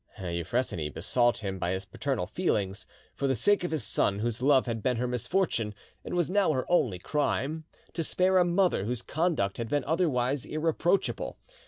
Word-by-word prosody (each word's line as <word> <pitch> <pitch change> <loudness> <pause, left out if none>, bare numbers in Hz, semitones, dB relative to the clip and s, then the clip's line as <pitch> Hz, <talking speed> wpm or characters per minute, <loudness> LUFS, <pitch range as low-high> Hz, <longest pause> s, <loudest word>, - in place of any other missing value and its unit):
Euphrosyne 85 -2 -2
besought 120 - +2
him 95 -1 -3
by 85 - -1
his 95 +2 -2
paternal 130 -1 -2
feelings, 105 - -1 0.3
for 140 - -1
the 135 - +2
sake 205 +7 +2
of 175 - -1
his 155 -6 -1
son 100 -1 +1
whose 115 +2 -2
love 135 0 +4
had 115 -3 -3
been 125 0 +1
her 125 +2 0
misfortune 125 - 0 0.3
and - - -4
was 175 -2 +2
now 195 -2 +2
her 130 -2 -1
only 120 - +3
crime, 150 - -1 0.3
to 165 - -2
spare 185 +3 +3
a - - +6
mother 175 - +2
whose 120 +1 -2
conduct 155 - 0
had 115 -1 -3
been 145 +1 +1
otherwise 140 -5 +1
irreproachable. 165 +4 0
130 Hz, 180 wpm, -29 LUFS, 105-165 Hz, 0.3 s, a